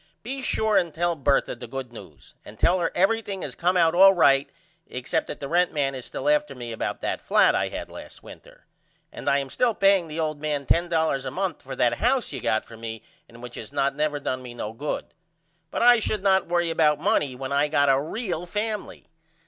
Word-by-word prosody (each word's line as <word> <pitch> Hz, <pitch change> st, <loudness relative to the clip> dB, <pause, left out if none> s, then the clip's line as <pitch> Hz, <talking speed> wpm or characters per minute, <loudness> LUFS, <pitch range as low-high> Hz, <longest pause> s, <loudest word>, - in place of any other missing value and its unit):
Be 265 Hz, +4 st, -5 dB
sure 220 Hz, -4 st, +1 dB
and 170 Hz, -3 st, +1 dB
tell 170 Hz, +2 st, 0 dB
Bertha 140 Hz, -2 st, +1 dB
the 120 Hz, -, -9 dB
good 130 Hz, 0 st, -7 dB
news -, -, -13 dB
and 105 Hz, -, -13 dB
tell 185 Hz, -, +3 dB
her 170 Hz, -, 0 dB
everything 200 Hz, 0 st, 0 dB
has -, -, -5 dB
came 180 Hz, +2 st, +1 dB
out 165 Hz, -2 st, +4 dB
all 195 Hz, +2 st, +7 dB
right 140 Hz, -5 st, +4 dB, 0.4 s
except 125 Hz, 0 st, -2 dB
that -, -, -7 dB
the 140 Hz, -, -5 dB
rent 175 Hz, +4 st, +2 dB
man 140 Hz, -2 st, 0 dB
is 130 Hz, -2 st, -7 dB
still -, -, -5 dB
after 300 Hz, -, +2 dB
me 120 Hz, -2 st, -7 dB
about 115 Hz, -, -4 dB
that -, -, -2 dB
flat -, -, +4 dB
I -, -, 0 dB
had -, -, -6 dB
last -, -, -11 dB
winter. -, -, -15 dB, 0.5 s
And -, -, -3 dB
I 140 Hz, -, +3 dB
am 140 Hz, -1 st, -2 dB
still 235 Hz, -, 0 dB
paying 195 Hz, -3 st, +3 dB
the 155 Hz, +1 st, -6 dB
old 155 Hz, -2 st, -2 dB
man 150 Hz, -2 st, -2 dB
$10.00 160 Hz, -5 st, +1 dB
a 130 Hz, -, -3 dB
month 185 Hz, +3 st, -3 dB
for 130 Hz, 0 st, -8 dB
that 120 Hz, -2 st, +1 dB
house 250 Hz, +1 st, +1 dB
you -, -, -5 dB
got 110 Hz, -, 0 dB
for 115 Hz, -, -13 dB
me 110 Hz, -1 st, -7 dB, 0.3 s
and 120 Hz, +1 st, -14 dB
which 120 Hz, -1 st, -8 dB
has 110 Hz, -, -8 dB
not 140 Hz, 0 st, 0 dB
never 150 Hz, 0 st, -1 dB
done 130 Hz, -2 st, -3 dB
me 125 Hz, -1 st, -9 dB
no 110 Hz, -2 st, -5 dB
good. 145 Hz, +6 st, -4 dB, 0.6 s
But -, -, -2 dB
I 240 Hz, -1 st, +7 dB
should 215 Hz, -2 st, -2 dB
not 190 Hz, -1 st, +3 dB
worry 175 Hz, -1 st, +1 dB
about 150 Hz, -3 st, +3 dB
money 155 Hz, -8 st, +1 dB
when 130 Hz, +1 st, -6 dB
I 140 Hz, +1 st, +2 dB
got 145 Hz, -1 st, +2 dB
a 135 Hz, 0 st, +4 dB
real 175 Hz, +1 st, -4 dB
family. 210 Hz, +2 st, -4 dB
155 Hz, 225 wpm, -25 LUFS, 135-190 Hz, 0.6 s, all